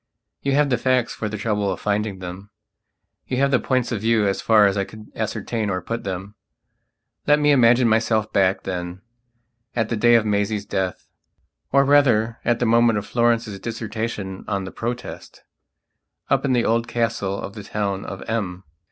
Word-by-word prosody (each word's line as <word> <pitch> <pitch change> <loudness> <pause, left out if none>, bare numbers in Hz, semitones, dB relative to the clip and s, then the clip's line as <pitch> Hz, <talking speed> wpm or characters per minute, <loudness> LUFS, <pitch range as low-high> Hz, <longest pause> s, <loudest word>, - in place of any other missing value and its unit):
You 140 - 0
have 145 0 +3
the 125 - +2
facts 130 -1 +1
for 110 - -4
the 105 - -4
trouble 105 -2 -1
of - - -4
finding 105 -1 -1
them; 95 +2 -8 0.8
you 125 - -2
have 140 +1 +2
the 125 - +4
points 130 -2 0
of 110 -4 -2
view 110 -1 +2
as 95 - -1
far 110 -2 +5
as 100 -1 +2
I 100 - +1
could 110 +2 -12
ascertain 110 0 -2
or 95 -2 -1
put 115 +6 -5
them. 95 +1 -5 0.9
Let 150 0 +6
me 150 0 +4
imagine 125 -2 +5
myself 110 -1 +1
back, 95 -1 +2
then, 90 +1 -5 0.7
at 115 -2 0
the 115 - 0
day 120 +2 +5
of 115 -2 +3
Maisie's 105 0 0
deathor 95 -1 -2 0.7
rather 135 -5 +4
at 120 -1 +2
the 120 - 0
moment 115 -1 +4
of 105 - -3
Florence's 115 -4 0
dissertation 110 -3 -4
on 100 -1 -1
the 95 - -7
Protest, 120 +2 -6 0.9
up - - +2
in 135 - +2
the 120 -2 +2
old 115 +1 +1
Castle 115 -5 -1
of 100 - -6
the 105 - -8
town 100 -1 -2
of 95 - -7
M. 100 -5 -3
110 Hz, 180 wpm, -22 LUFS, 100-120 Hz, 0.9 s, Let